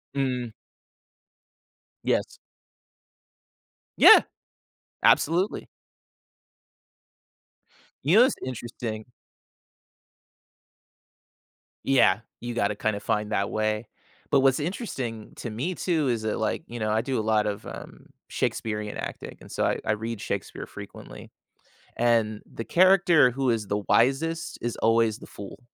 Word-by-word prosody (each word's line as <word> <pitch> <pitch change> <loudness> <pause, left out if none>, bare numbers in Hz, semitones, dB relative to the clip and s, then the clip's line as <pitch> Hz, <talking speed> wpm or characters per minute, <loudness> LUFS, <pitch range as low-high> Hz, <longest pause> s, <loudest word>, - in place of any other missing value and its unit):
Mm. 125 -4 -1 1.5
Yes. - - 0 1.6
Yeah, - - +10 0.8
absolutely. 175 +6 +3 2.4
You 160 +9 +4
know 240 - +9
what's 260 - +2
interesting? 120 -3 -5 2.8
Yeah, 115 -7 +4 0.2
you 120 0 -5
gotta 105 -2 0
kind 110 0 -1
of 100 - -7
find 105 0 -1
that 100 -1 0
way. 110 0 -1 0.4
But 140 - +5
what's 135 +1 +3
interesting 135 - -5
to 120 - -5
me, 140 +12 -3
too, 160 -5 0
is 115 -3 -1
that, 110 - -2
like, 110 +7 -1
you 120 - -7
know, 110 -1 -1
I 110 +1 +2
do 130 0 -2
a - - +1
lot 110 -1 +2
of, 105 -1 -4
um, - - -10 0.2
Shakespearean 105 -1 -3
acting - - -7
and - - -14
so - - -1
I - - 0
I - - +1
read 110 0 -3
Shakespeare - - -4
frequently, - - -11 0.7
and 115 -3 +2
the 115 - -6
character 175 -5 +5
who 130 +1 0
is 110 -3 -1
the 105 +1 -2
wisest 145 +8 +1
is 120 -1 -2
always 115 -1 +2
the - - -12
fool 100 -1 -10
115 Hz, 125 wpm, -26 LUFS, 110-135 Hz, 2.8 s, Yeah